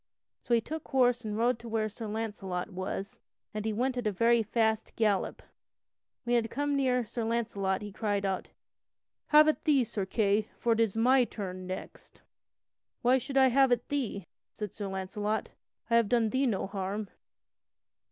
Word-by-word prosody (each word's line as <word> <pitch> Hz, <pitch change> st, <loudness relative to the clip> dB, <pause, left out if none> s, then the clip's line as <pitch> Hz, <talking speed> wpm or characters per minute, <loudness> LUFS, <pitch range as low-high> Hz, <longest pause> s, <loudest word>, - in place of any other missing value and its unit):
So 240 Hz, -, +2 dB
he 230 Hz, -, +2 dB
took 315 Hz, +6 st, -6 dB
horse 245 Hz, -2 st, +3 dB
and 210 Hz, -1 st, -3 dB
rode 235 Hz, +1 st, +2 dB
to 235 Hz, -, -9 dB
where 220 Hz, -1 st, 0 dB
Sir 220 Hz, +1 st, -7 dB
Launcelot 205 Hz, -4 st, -4 dB
was, 190 Hz, +1 st, -5 dB, 0.3 s
and 215 Hz, 0 st, -4 dB
he 220 Hz, -, +1 dB
went 250 Hz, +4 st, 0 dB
at 240 Hz, -3 st, -1 dB
a -, -, +2 dB
very 230 Hz, +4 st, +3 dB
fast 220 Hz, 0 st, 0 dB
gallop. 210 Hz, -4 st, 0 dB, 0.8 s
When 240 Hz, -, -3 dB
he -, -, +4 dB
had 225 Hz, -1 st, 0 dB
come 290 Hz, +2 st, -1 dB
near 255 Hz, -3 st, +2 dB
to -, -, -14 dB
Sir 235 Hz, +1 st, -3 dB
Launcelot 215 Hz, -4 st, -1 dB
he 205 Hz, -, -6 dB
cried 205 Hz, -1 st, -1 dB
out: 190 Hz, -1 st, -2 dB, 0.8 s
"Have 305 Hz, 0 st, +7 dB
at 310 Hz, -, +1 dB
thee, 285 Hz, -5 st, +4 dB
Sir 205 Hz, -4 st, -4 dB
Kay, 210 Hz, 0 st, +1 dB
for 235 Hz, -, +2 dB
it 225 Hz, -, -2 dB
is 225 Hz, -2 st, +1 dB
my 255 Hz, +3 st, +5 dB
turn 185 Hz, -5 st, -6 dB
next!" 185 Hz, 0 st, -8 dB, 0.8 s
"Why 255 Hz, +2 st, +5 dB
should 270 Hz, +2 st, -4 dB
I 265 Hz, -1 st, +6 dB
have 265 Hz, +1 st, +4 dB
at 240 Hz, -1 st, +1 dB
thee?" 240 Hz, -10 st, -2 dB, 0.3 s
said 210 Hz, -3 st, -6 dB
Sir 205 Hz, -2 st, -5 dB
Launcelot, 205 Hz, +3 st, -2 dB, 0.4 s
"I 230 Hz, -, +6 dB
have 230 Hz, -3 st, +2 dB
done 230 Hz, -3 st, +2 dB
thee 265 Hz, +1 st, +2 dB
no 210 Hz, -5 st, 0 dB
harm." 195 Hz, +1 st, -3 dB
225 Hz, 185 wpm, -30 LUFS, 205-245 Hz, 0.8 s, Have